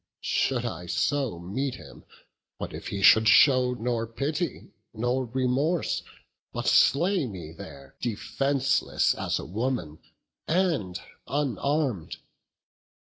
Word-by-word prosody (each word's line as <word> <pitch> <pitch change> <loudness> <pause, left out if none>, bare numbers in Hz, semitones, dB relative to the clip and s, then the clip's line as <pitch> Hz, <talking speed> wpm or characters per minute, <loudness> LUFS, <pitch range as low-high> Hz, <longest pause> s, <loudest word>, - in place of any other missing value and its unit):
Should 125 -3 0
I 90 -6 -5
so 135 - 0
meet 120 +10 -3
him, - - -13 0.5
what - - -6
if - - -7
he 100 -1 -3
should 110 +3 +7
show 125 +2 +5
Nor 115 -1 -2
pity 145 +8 -3 0.2
nor 120 +3 0
remorse, 130 +7 0 0.5
but - - -4
slay 175 0 +4
me 90 -7 -8
there, 70 -4 -11
Defenceless 135 +4 +1
as - - -2
a - - -6
woman, 110 -6 -3 0.5
and 160 - 0 0.3
unarm'd? 140 - -1
125 Hz, 110 wpm, -27 LUFS, 105-140 Hz, 0.5 s, should